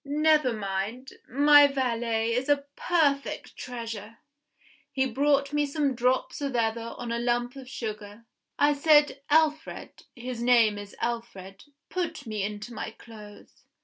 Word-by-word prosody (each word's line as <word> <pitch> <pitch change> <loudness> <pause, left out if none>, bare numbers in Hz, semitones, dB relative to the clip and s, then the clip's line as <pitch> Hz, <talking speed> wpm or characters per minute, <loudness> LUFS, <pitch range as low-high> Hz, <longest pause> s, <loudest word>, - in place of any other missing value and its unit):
Never 300 -1 +3
mind 210 +5 -4 0.2
my 290 +3 +7
valet 230 -4 -1
is 255 +4 -1
a 285 -1 +2
perfect 290 -5 0
treasure; 230 -3 -7 0.7
he 265 -1 +1
brought 280 +2 +1
me 295 0 +1
some 285 -1 0
drops 255 +3 0
of 275 -3 -2
ether 230 0 -1
on 235 - -5
a 235 - -1
lump 240 +1 -1
of 265 -2 -10
sugar. 215 -3 -7 0.3
I 290 0 +4
said, 295 -1 +4
'Alfred' 310 +1 0
(his 245 -1 -6
name 230 -4 +4
is 205 0 -10
Alfred), 200 -5 -5 0.2
'put 345 -6 -3
me 215 -2 -3
into 210 +4 -5
my - - -5
clothes! 215 -2 -14
245 Hz, 140 wpm, -27 LUFS, 225-285 Hz, 0.7 s, my